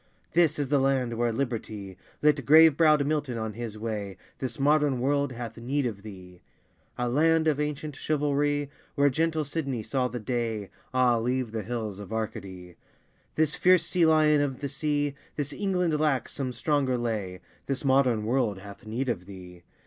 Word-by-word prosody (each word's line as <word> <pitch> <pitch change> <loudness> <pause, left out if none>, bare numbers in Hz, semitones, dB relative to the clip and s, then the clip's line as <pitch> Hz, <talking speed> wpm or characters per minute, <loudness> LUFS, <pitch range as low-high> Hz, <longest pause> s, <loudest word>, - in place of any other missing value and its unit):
This 165 -3 +3
is 145 -3 -2
the 145 -1 +3
land 130 -3 +1
where 120 0 0
liberty 110 -6 -4 0.3
Lit 150 -2 +3
grave 155 +2 +7
browed 155 -2 +4
Milton 145 -5 -1
on 110 -1 -3
his 115 -1 -6
way, 105 -3 -4 0.2
This 130 -2 -4
modern 145 -2 +3
world 140 +1 +1
hath 120 -1 -7
need 130 +4 -1
of 105 -5 -4
thee! 95 -4 -12 0.6
A 125 - -1
land 160 +5 +3
of 150 -2 +2
ancient 150 0 -3
chivalry 145 -1 0 0.2
Where 140 -1 +4
gentle 160 +2 0
Sidney 140 -6 -3
saw 130 +2 0
the 125 0 -5
day, 115 -3 -3 0.2
Ah, 125 -2 +3
leave 125 0 -1
the 110 -1 -3
hills 110 -2 -4
of 105 0 -9
Arcady. 95 -5 -5 0.6
This 155 -1 +2
fierce 180 -1 +4
sea 175 -3 +3
lion 155 -2 +4
of 135 -2 -2
the 140 - -2
sea, 145 0 -1 0.2
This 145 -1 -3
England 180 -6 0
lacks 150 -4 0
some 130 -2 -3
stronger 135 -1 0
lay, 105 -6 -3 0.3
This 135 +1 -2
modern 130 -5 +3
world 115 -4 +1
hath 100 +2 -12
need 120 +5 -2
of 95 -7 -3
thee! 90 -3 -11
130 Hz, 170 wpm, -27 LUFS, 110-150 Hz, 0.6 s, grave